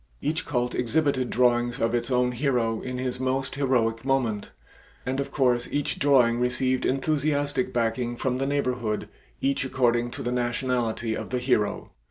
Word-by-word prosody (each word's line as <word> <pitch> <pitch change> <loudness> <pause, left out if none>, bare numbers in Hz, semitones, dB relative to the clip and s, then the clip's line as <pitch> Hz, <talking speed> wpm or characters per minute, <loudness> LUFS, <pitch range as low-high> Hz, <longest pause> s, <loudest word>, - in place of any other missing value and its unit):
Each 160 +2 -2
cult 125 -4 0
exhibited 130 0 +1
drawings 120 +1 +2
of 115 -1 +1
its 120 +2 0
own 125 -1 +2
hero 120 -4 0
in 125 0 -4
his 125 0 -3
most 130 +1 -1
heroic 120 -5 +1
moment, 125 -6 0 0.5
and 130 +2 -1
of 140 - -2
course 125 -3 +1
each 145 -1 -1
drawing 125 -5 +4
received 130 +1 +1
enthusiastic 145 0 0
backing 120 +1 -1
from 125 +1 -1
the 135 - 0
neighborhood, 125 -6 -1 0.3
each 140 0 +1
according 120 -2 +1
to - - -6
the 120 - -1
nationality 120 -2 -1
of - - -5
the 125 - -1
hero. 115 -5 0
125 Hz, 160 wpm, -26 LUFS, 120-135 Hz, 0.5 s, drawing